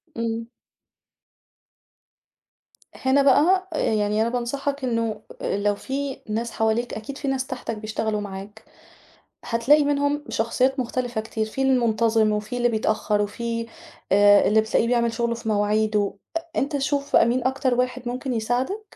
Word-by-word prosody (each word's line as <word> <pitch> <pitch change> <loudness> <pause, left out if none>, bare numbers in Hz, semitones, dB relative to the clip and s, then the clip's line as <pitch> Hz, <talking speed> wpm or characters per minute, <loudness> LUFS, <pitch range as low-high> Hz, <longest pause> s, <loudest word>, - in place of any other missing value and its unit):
امم. 230 0 -3 2.5
هنا 265 +2 +2
بقى 360 +8 +4
آآ - - -2 0.2
يعني 210 0 +1
أنا 230 - +1
بانصحك 275 +3 -3
إنه 230 -3 -1 0.2
لو 205 0 0
في 270 +4 -4
ناس 230 +2 -2
حواليك، 225 +2 0
أكيد 270 +6 -6
في 280 - -5
ناس 265 -1 -1
تحتَك 225 - -5
بيشتغلوا 215 0 -2
معاك، 200 +1 -8 0.8
هتلاقي 265 +6 +3
منهم 285 +1 0
شخصيات 255 +4 +1
مختلفة 245 -2 -2
كتير. 220 0 -3
في 270 +5 -3
المُنتظم 230 -4 +2
وفي 210 +3 -3
اللي 240 0 +2
بيتأخر 215 -1 0
وفي 230 +2 -3 0.5
آآ 205 0 +6
اللي 220 +1 +5
بتلاقيه 220 +1 +1
بيعمل 235 -1 +1
شُغله 235 0 -1
في 225 -1 -6
مواعيده، 210 -1 +1 0.2
أ - - +1 0.2
أنت 285 +1 0
شوف 280 +1 -1
بقى - - +6
مين 245 +1 0
أكتر 265 -1 +1
واحد 250 0 -1
مُمكن 255 +1 -3
يساعدك 255 - -2
235 Hz, 140 wpm, -24 LUFS, 220-265 Hz, 2.5 s, آآ